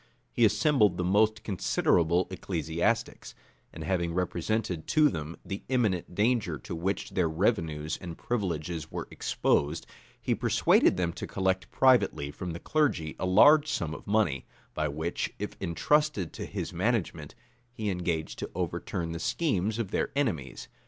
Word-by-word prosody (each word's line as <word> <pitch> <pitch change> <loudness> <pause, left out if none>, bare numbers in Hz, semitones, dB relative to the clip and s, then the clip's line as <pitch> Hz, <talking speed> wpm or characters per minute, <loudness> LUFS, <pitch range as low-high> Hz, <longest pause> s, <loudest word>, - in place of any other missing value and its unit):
He 120 - +3
assembled 105 - +3
the 90 - -1
most 105 +4 +2
considerable 85 - +2
ecclesiastics; 95 +5 -2 0.4
and - - -8
having 85 -3 -1
represented 90 0 -1
to 155 -1 +4
them 80 - -5
the 95 0 -5
imminent 105 -9 0
danger 105 -6 +1
to 65 - -8
which 95 +5 -2
their 90 -4 +1
revenues 80 -4 0
and 85 -3 -7
privileges 85 -8 -3
were - - -5
exposed, 75 +3 0 0.3
he - - 0
persuaded - - +3
them 85 -2 0
to - - -6
collect 95 -1 -1
privately 125 - +3
from 85 +3 -5
the 85 - -6
clergy 130 - 0
a 90 - -1
large 145 +11 +6
sum 80 -2 -2
of - - -10
money, 100 -10 +1 0.3
by 75 0 -1
which, 80 +4 -3
if - - -5
intrusted 150 - +1
to - - -5
his - - -5
management, 90 -6 -1 0.4
he 110 -4 -3
engaged 85 -3 -2
to - - -4
overturn 85 -2 -3
the 85 - -4
schemes 110 - 0
of 115 -5 -3
their - - 0
enemies. 110 - -2
90 Hz, 150 wpm, -29 LUFS, 80-110 Hz, 0.4 s, large